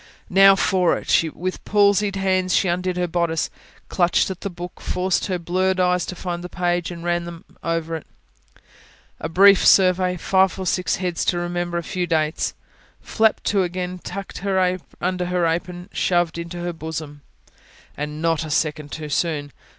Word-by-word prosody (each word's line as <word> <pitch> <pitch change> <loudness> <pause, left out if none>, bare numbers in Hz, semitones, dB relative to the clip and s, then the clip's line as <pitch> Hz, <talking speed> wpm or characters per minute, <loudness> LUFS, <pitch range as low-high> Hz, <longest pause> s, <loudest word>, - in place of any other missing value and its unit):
Now 195 +1 +7
for 185 -2 +2
it! 160 -1 +1
With 185 +1 -4
palsied 205 0 +3
hands 185 -1 +1
she 190 - +2
undid 180 +1 -1
her 180 - +1
bodice, 170 -1 -1 0.4
clutched 175 +1 +2
at 185 - -8
the 200 - -3
book, 175 0 -9
forced 185 0 0
her 185 -2 -1
blurred 185 +2 0
eyes 180 -1 +2
to 180 - -5
find 175 -1 -4
the 180 - -6
page, 175 -1 -1
and 170 -1 -8
ran 175 0 0
them 170 +1 -9 0.2
over 165 -1 -1
it. 160 - -13 1.1
A 160 - -4
brief 195 +3 +6
survey: 185 -1 +4
five 190 +2 +2
or 190 - -4
six 180 0 0
heads 180 -2 -2
to 175 - +1
remember: 175 0 -2
a 170 - -2
few 180 +1 -3
dates. 155 -1 0 0.5
Flapped 220 -1 +1
to 200 -2 +2
again; 180 0 -3
tucked 195 +1 -7
under 185 -1 -1
her 180 -1 0
apron; 175 +2 -2
shoved 175 -2 +1
into 170 +1 -6
her 175 0 -3
bosom. 160 -2 -6 0.7
And 150 +2 -5
not 165 -1 +1
a 155 - -6
second 150 -1 -1
too 155 -1 -6
soon. 145 -2 -1
175 Hz, 170 wpm, -22 LUFS, 165-185 Hz, 1.1 s, Now